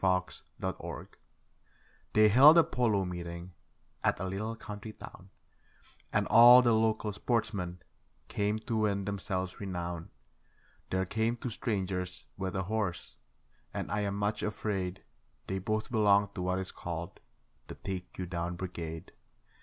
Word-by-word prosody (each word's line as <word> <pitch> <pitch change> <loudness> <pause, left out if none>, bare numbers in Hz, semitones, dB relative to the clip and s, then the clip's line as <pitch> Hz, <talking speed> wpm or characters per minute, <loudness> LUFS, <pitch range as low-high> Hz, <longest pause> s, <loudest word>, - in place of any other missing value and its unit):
Out 90 -1 +1 0.2
of - - -1
Sight - - -7 1.0
They 110 0 +6
held 140 +9 +9
a 170 - +8
polo 110 -9 +1
meeting 85 0 -6 0.5
at - - +2
a 95 - -2
little 105 +4 -3
country 105 0 -8
town, 95 -2 -12 0.8
And - - +2
all 120 +2 +9
the 120 -2 +4
local 110 -1 +1
sportsmen 100 -6 -2 0.4
came 105 +1 0
to 115 0 -2
win 100 -2 +1
themselves 95 -2 -3
renown. 90 -2 -4 0.8
There 95 0 0
came 110 +4 0
two 120 0 -4
strangers 95 -5 -3
with 95 -1 -4
a 95 - 0
horse, 100 -3 -3 0.6
and - - -3
I 105 - 0
am 100 -1 -1
much 105 +1 -1
afraid 95 -4 -2 0.4
They 95 0 -2
both 110 +5 -2
belonged 100 -3 +4
to 90 - -5
what 90 +1 0
is 95 -1 -4
called 85 +2 -6 0.5
'the - - -8
take 95 -2 -6
you 90 - -3
down 85 0 -3
brigade'. 85 -3 -6
100 Hz, 145 wpm, -31 LUFS, 90-110 Hz, 1.0 s, held